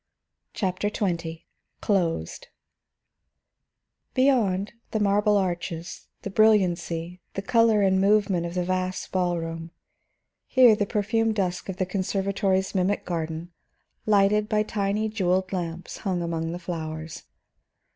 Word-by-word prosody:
CHAPTER 190 0 -1
XX 170 -6 -3 0.4
CLOSED 170 - -1 1.7
Beyond, 220 -7 +2 0.2
the 220 - -1
marble 205 +1 +3
arches, 175 -2 -3 0.2
the 200 - -4
brilliancy, 180 -5 +2
the 195 - -3
color 225 -1 +4
and 190 -1 +3
movement 195 -4 +2
of 170 - -7
the 180 - +1
vast 185 0 -2
ball 180 -2 +1
room; 165 0 -5 0.8
here, 250 -4 +6
the 205 -1 -1
perfumed 220 +1 +1
dusk 185 -2 -2
of 190 - -4
the 185 - 0
conservatory's 190 0 0
mimic 195 +1 0
garden, 165 0 -4 0.6
lighted 210 +1 +3
by 215 0 +2
tiny 210 0 -1
jeweled 190 -3 0
lamps 175 -1 -4
hung 185 -4 -2
among 165 -1 -2
the 175 - -4
flowers. 160 -2 -6
190 Hz, 120 wpm, -25 LUFS, 175-210 Hz, 1.7 s, here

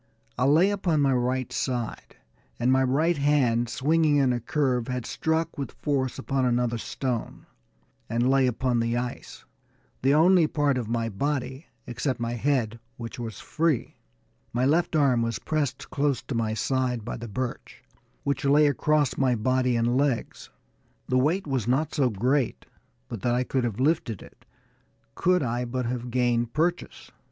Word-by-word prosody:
I 125 - +1
lay 160 +8 +5
upon 180 -6 0
my 135 -1 +3
right 125 0 -1
side, 120 -4 -3 0.4
and 120 +2 +2
my 130 0 +4
right 150 +6 +2
hand, 130 -5 +2
swinging 155 +4 +2
in 135 -3 +3
a 120 - -1
curve, 125 -1 0
had 125 -2 -3
struck 160 0 -1
with 140 - -4
force 135 -3 0
upon 135 0 -1
another 120 -1 +1
stone, 125 0 -4 0.6
and 120 +2 +1
lay 135 0 +4
upon 125 0 0
the 115 +1 0
ice, 125 0 -6 0.6
the 135 +2 +3
only 170 +1 +5
part 145 -4 +1
of 115 - -4
my 115 -1 0
body, 135 - -3 0.2
except 130 +1 -2
my 115 0 -2
head, 120 -2 0 0.2
which 115 +2 -7
was 115 -2 -6
free. 160 -5 -1 0.6
My 125 +2 +1
left 165 +4 +2
arm 135 -6 +3
was 115 -1 -1
pressed 155 -4 -3
close 140 -3 0
to - - -5
my 110 -2 -1
side 125 -1 -1
by - - -4
the 120 0 -7
birch, 125 +4 -5 0.4
which 140 0 -1
lay 145 +2 +5
across 145 0 +1
my 130 -2 +3
body 125 +2 +1
and 120 +2 +1
legs. 135 -4 -1 0.6
The 130 - +3
weight 165 +9 +1
was 130 -6 -2
not 140 +5 +1
so 135 -5 +2
great 125 +5 0 0.4
but - - -7
that 120 -1 +1
I 125 - +1
could 130 0 -1
have 115 -2 -2
lifted 130 - 0
it, - - -18 0.7
could 180 -2 +2
I 120 0 -1
but 125 +1 -3
have 120 0 -3
gained 120 -1 0
purchase. 175 +3 -2
130 Hz, 165 wpm, -26 LUFS, 120-145 Hz, 0.7 s, lay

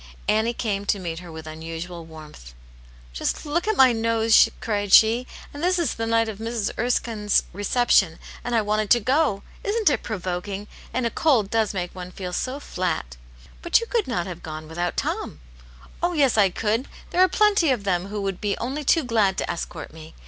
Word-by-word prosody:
Annie 220 +2 +2
came 205 -4 -2
to - - +2
meet 170 -4 -5
her 175 -1 -10
with 160 0 -9
unusual 165 +2 -7
warmth. 155 - -12
V - - -12 0.6
Just - - -2
look 335 +6 -1
at 435 - +1
my 260 -1 +7
nose! 225 0 +4
" - - -22
cried 205 -3 -2
she. 230 +5 +6
" - - -17
And 290 - -7
this 365 +1 +2
is 340 -3 0
the 225 0 -3
night 230 0 +2
of 215 -2 -6
Mrs. 225 -2 -2
Erskine*s 225 -3 +1
reception, 205 -4 +2 0.3
and 240 0 -1
I 225 - +3
wanted 210 0 0
to 240 - +6
go 255 -3 +1 0.2
I - - -7
Isn't 425 -4 +3
it 255 - 0
provoking? 195 0 -4 0.2
And 255 -1 -1
a 230 - 0
cold 240 -11 +2
does 220 -2 +1
make 180 -2 -3
one 180 -1 -7
feel 180 -1 -6
so 260 +8 -2
flat! 170 - -3
" - - -22
" - - -23
But 345 - +4
you 465 - -4
could 465 -2 -1
not 180 -9 -1
have 175 -2 -7
gone 155 -1 -7
without 175 +2 -3
Tom." - - -3 0.3
" 60 +1 -21
Oh, 350 +1 +1
yes, 280 -6 +3
I 205 -3 +5
could! 220 +7 -1 0.2
There 360 - +2
are 370 - +6
plenty 405 -5 +3
of 245 -6 +1
them 185 -1 0
who 205 0 -4
would 195 -2 -3
be 205 -1 -1
only 270 +5 -3
too 320 +3 +3
glad 215 -6 +2
to - - -1
escort 165 -2 -6
me. 160 0 -12
210 Hz, 220 wpm, -24 LUFS, 180-250 Hz, 0.6 s, my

